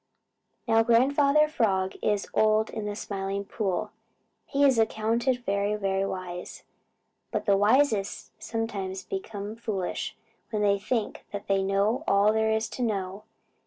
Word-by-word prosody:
Now 225 0 +5
Grandfather 280 +6 +4
Frog 195 -10 0
is 205 -1 0
old 215 0 +3
and - - -5
in 210 - -4
the 205 - -3
Smiling 200 -1 -3
Pool 195 -2 -2 0.6
he 285 0 +2
is 265 -4 +4
accounted 230 +3 +1
very, 200 +1 0
very 195 -1 0
wise. 180 -2 -6 0.7
But - - -2
the 200 - +4
wisest 210 0 +2
sometimes 200 -5 -3
become 205 +2 -5
foolish 210 -6 -3 0.3
when 210 -2 -1
they 200 -1 +3
think 220 +1 -3
that 205 0 -5
they 195 -1 +2
know 200 +7 +1
all 200 +2 +4
there 220 0 +2
is 220 0 +1
to - - -6
know. 200 -3 -2
210 Hz, 145 wpm, -27 LUFS, 195-225 Hz, 0.7 s, Now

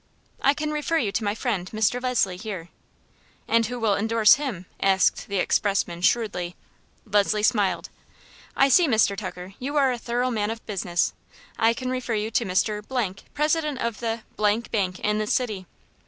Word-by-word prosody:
"I 280 +1 +4
can 305 +1 -2
refer 305 +2 0
you 220 -10 0
to 215 - -1
my 205 0 0
friend, 210 -7 -2
Mr. 220 +3 0
Leslie, 245 -7 +1
here." 185 -5 -6 0.8
"And 230 -1 +3
who 245 +1 -5
will 220 -3 +2
indorse 220 +1 +5
him?" 255 -11 -3 0.2
asked 190 -1 +2
the 200 - -2
expressman, 185 -2 0
shrewdly. 180 -4 0 0.5
Leslie 210 0 +2
smiled. 210 -4 +1 0.7
"I 275 - +5
see, 330 +5 +5
Mr. 220 -5 +3
Tucker, 185 -1 -7
you 280 +4 -4
are 270 -2 +4
a 245 - -3
thorough 245 +2 -1
man 210 -2 -1
of 225 0 -6
business. 175 -4 -1 0.5
I 225 +1 +4
can 255 +1 -3
refer 255 -3 -2
you 215 +1 -2
to 230 - +1
Mr., 210 +2 -1 0.2
president 300 -1 +1
of 235 -2 -2
the 230 -1 -2 0.2
Bank 215 +2 +1 0.3
in 210 0 +1
this 215 0 0
city." 210 -8 -2
220 Hz, 170 wpm, -25 LUFS, 200-250 Hz, 0.8 s, indorse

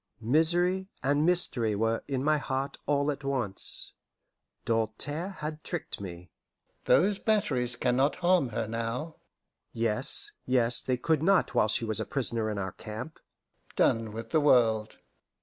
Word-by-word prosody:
Misery 175 - +2
and 145 +4 +2
mystery 120 -11 +3
were 115 +2 -1
in 135 -2 -2
my 155 0 +2
heart 135 0 -4
all 145 0 +1
at 145 0 -7
once. 130 -8 +1 0.7
Doltaire 115 - -1
had 155 -4 -7
tricked 175 - -5
me. 90 -2 -9 0.5
"Those 190 +10 +3
batteries 130 - 0
can 125 - 0
not 140 +2 +2
harm 175 -6 +2
her 110 0 -3
now!" 115 +8 -4 0.6
Yes, 115 - +2
yes, 125 -2 +3
they 130 -1 -1
could 155 +4 0
not 190 +3 +2
while - - +3
she 115 +2 0
was 110 -2 0
a 110 - -2
prisoner 115 -4 -2
in 105 - -4
our 95 -2 -3
camp. 110 - -8 0.6
"Done 115 -1 +1
with 115 +1 -8
the 155 - +3
world!" 115 -6 +3
130 Hz, 150 wpm, -28 LUFS, 115-155 Hz, 0.7 s, mystery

